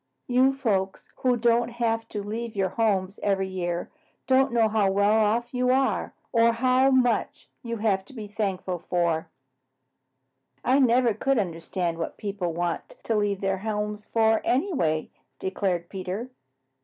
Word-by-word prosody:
You 255 +2 +4
folks 195 -8 -1
who 250 -1 +2
don't 235 0 +2
have 225 -1 -1
to 205 - -4
leave 225 +2 -5
your 190 -1 +1
homes 195 -3 0
every 195 -1 +1
year 175 -2 -3 0.3
don't 265 +1 +3
know 230 -2 +3
how 215 -2 +2
well 200 +1 +3
off 220 +3 +1
you 250 0 +1
are 265 +1 +1 0.2
or 230 0 +4
how 255 +3 +3
much 255 -3 +1
you 235 -3 -4
have 205 -3 +1
to - - -15
be 220 -4 -7
thankful 195 -4 -3
for." 170 -2 -1 1.4
"I 260 +3 +4
never 245 -2 +4
could 270 +5 0
understand 170 -2 -2
what 165 - -4
people 200 -4 -3
want 170 0 -3
to 225 - 0
leave 205 -2 0
their 195 -1 0
homes 210 0 -3
for, 220 -1 +2
anyway," 250 - 0 0.3
declared 185 -2 -2
Peter. 195 +7 -5
215 Hz, 150 wpm, -26 LUFS, 190-240 Hz, 1.4 s, You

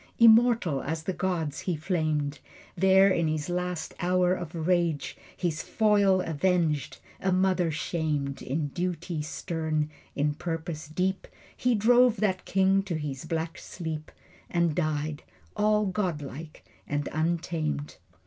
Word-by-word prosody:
Immortal 230 - +5
as 160 +2 -3
the 190 - -2
gods 165 -6 -2
he 180 - -1
flamed. 155 -3 -1 0.4
There 190 +2 +5
in 170 -3 +2
his 155 0 -2
last 180 -1 -2
great - - -5
hour 180 0 +3
of 175 -3 -5
rage 170 -5 +1 0.2
His 170 -4 -1
foil 205 -3 +3
avenged 165 -2 0 0.2
a 190 - 0
mother 185 -2 +2
shamed. 150 -3 -2
In 145 +2 -2
duty 175 0 -3
stern, 155 -1 -2 0.2
in 145 +1 +1
purpose 160 0 -4
deep 185 +5 -1 0.3
He 250 -1 +2
drove 240 +2 +5
that 190 -4 0
king 195 0 +3
to 190 -3 -4
his 150 -3 -4
black 165 0 -3
sleep 160 -3 -6 0.4
And 170 -2 +1
died, 155 -2 -1 0.3
all 210 0 +3
godlike 160 -6 -4 0.2
and 145 0 -1
untamed. 160 -2 -2
170 Hz, 130 wpm, -28 LUFS, 155-190 Hz, 0.4 s, Immortal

